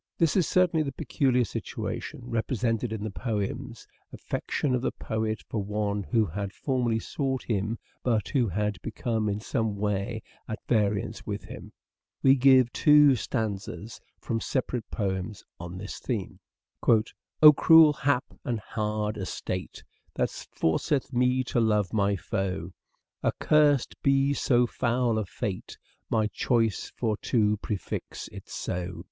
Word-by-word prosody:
This 165 -4 +2
is 185 - +3
certainly 180 -3 +3
the 140 -3 -2
peculiar 130 -2 +1
situation 115 - -5
repre 120 +1 -2
sented 115 0 0
in 110 -2 -4
the 110 - -3
poems: 115 +3 -4 0.3
affection 140 -4 -2
of 125 - +1
the - - 0
poet 110 -1 -3
for 110 - -2
one 105 0 -1
who 110 +2 +1
had 100 +3 -4
formerly 125 -4 0
sought 130 +2 -2
him 110 +1 -1 0.2
but 115 -4 0
who 130 -6 +2
had 105 +1 -2
become 110 -3 -2
in 100 +1 -2
some 110 -1 -1
way 105 +2 -2 0.2
at 110 - -3
variance 105 -3 0
with - - -3
him. - - -10 0.5
We 135 - +7
give 130 -2 +5
two 150 -2 +6
stanzas 110 -1 -4 0.2
from 115 -2 -3
separate 125 -3 -2
poems 95 -1 -3 0.2
on 85 +1 -7
this 100 +2 -7
theme: 110 -7 -4 0.2
" - - -18 0.6
O 150 0 +12
cruel 160 -1 +7
hap 135 -2 +1 0.2
and 120 -3 -2
hard 105 0 -2
estate 95 -1 -5 0.3
That - - 0
forceth 130 - -1
me 125 +1 +2
to 125 - -1
love 105 -4 +2
my 100 -1 +2
foe; 95 -1 -3 0.5
Accursed 150 -4 +3
be 135 0 +3
so 125 -3 +3
foul 120 -1 0
a 105 - -3
fate, 95 +1 -5 0.3
My 110 -1 +2
choice 115 0 0
for 110 -3 -1
to 105 -4 +1
prefix 100 -1 -5
it - - -11
so. 90 -1 -4
110 Hz, 145 wpm, -27 LUFS, 105-130 Hz, 0.6 s, O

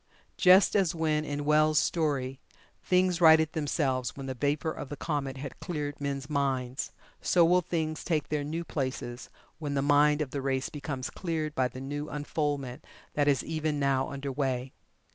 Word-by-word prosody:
Just 185 +3 +6
as 190 -4 +2
when, 155 -2 +1
in 145 -1 -3
Well's 155 +1 +4
story, 135 -3 0 0.4
things 180 -1 +2
righted 160 -1 +6
themselves 135 -5 -1
when 135 - -6
the 130 - -3
vapor 145 +5 0
of 145 - -7
the 145 - -6
comet 140 -4 -2
had 135 0 -7
cleared 145 -4 -4
men's 140 -1 -3
minds, 135 -2 -1 0.3
so 175 -2 +4
will 180 +2 +4
Things 160 -2 -2
take 155 -4 -1
their 150 -1 -1
new 160 +4 -3
places 130 -5 -4 0.3
when 145 -2 -3
the 135 - +1
mind 145 +1 +4
of 135 - -9
the 140 - -3
race 135 -1 -1
becomes 140 -4 -5
cleared 160 -4 -3
by 130 -3 +1
the 130 - -9
new 145 +2 -4
unfoldment 145 -3 -3 0.3
that 145 -1 +1
is 140 -2 +3
even 155 -2 -2
now 135 -1 +1
under 140 0 -4
way. 130 -2 -2
145 Hz, 175 wpm, -29 LUFS, 135-155 Hz, 0.4 s, Just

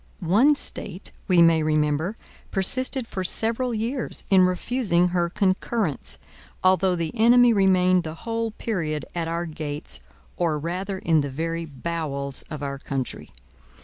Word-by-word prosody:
One 275 +8 +6
State, 190 -8 -3 0.2
we 180 -3 +6
may 165 -1 +5
remember, 155 +5 0 0.3
persisted 255 +6 +1
for 190 - -4
several 230 +6 +2
years 230 +3 -3
in 185 -1 +6
refusing 180 -2 +1
her 175 -1 0
concurrence, 195 - -1 0.5
although 185 0 +3
the 165 -2 -3
enemy 240 +1 +6
remained 185 -2 +3
the 160 -1 -6
whole 230 0 -1
period 165 - -3
at 170 -2 -2
our 170 +1 -2
gates, 155 -2 -5 0.4
or 165 -3 +1
rather 185 +5 -3
in 160 -4 +2
the 140 - -3
very 165 +4 -3
bowels 140 -2 -3
of 150 -2 -6
our 140 -1 -4
country. 135 -2 -5
180 Hz, 140 wpm, -24 LUFS, 155-215 Hz, 0.5 s, One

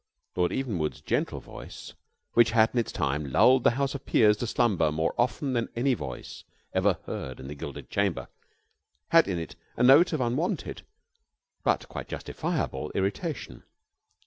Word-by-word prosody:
Lord 90 -1 +1
Evenwood's 100 - -2
gentle - - -1
voice, - - -10 0.4
which 115 -1 +5
had 110 0 +5
in 125 - +2
its 115 - -2
time 70 0 -2
lulled 130 - +5
the - - +6
House 140 0 0
of 140 -1 -6
Peers 105 -2 +4
to 120 - -3
slumber 100 -11 +2
more 80 +2 0
often 130 +3 0
than 120 -2 -1
any 130 +3 +2
voice 65 - -7 0.3
ever - - +2
heard 65 -1 -6
in 65 - -8
the 75 - -6
Gilded 70 - -8
Chamber, - - 0 0.8
had 165 0 +6
in 95 -3 -1
it 80 -1 -6 0.2
a 120 - +2
note 140 +8 +7
of 155 - -1
unwonted, 140 - -1 0.8
but - - +1
quite - - -7
justifiable, 65 +3 -3
irritation. 125 - -3
115 Hz, 160 wpm, -27 LUFS, 80-130 Hz, 0.8 s, note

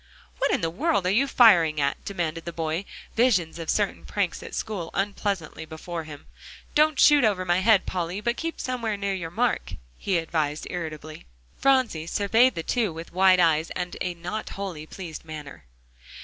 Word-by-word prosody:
"What - - +2
in - - +1
the 165 -1 -1
world 280 - 0
are 180 - +2
you 260 +8 +3
firing 175 - +5
at?" 140 0 -1
demanded 165 -4 -3
the 170 - -4
boy, 165 +3 -2 0.3
visions 190 -9 +2
of 165 - -6
certain 205 -2 0
pranks 200 -4 -2
at - - -8
school 200 -7 -4
unpleasantly 195 -5 -2
before 160 +1 -6
him. 150 -2 -10 0.5
"Don't 305 0 +3
shoot 295 -2 +7
over 200 -4 +2
my 175 0 +2
head, 205 0 +4
Polly, 180 +1 -3
but 235 +3 -1
keep 330 +4 -4
somewhere 235 -5 -2
near 200 0 -1
your 175 -4 -4
mark," 225 - -1 0.3
he 190 -3 0
advised 155 -2 -1
irritably. 155 - -6 0.3
Phronsie 255 -13 +2
surveyed 225 +7 +3
the 165 - -3
two 225 -2 0
with 165 +1 -9
wide 185 0 +5
eyes, 160 -2 +3
and 180 -1 -3
a 180 -1 -2
not 180 +6 -5
wholly 180 -6 -6
pleased 170 -4 -8
manner. 150 - -9
180 Hz, 175 wpm, -25 LUFS, 165-215 Hz, 0.5 s, shoot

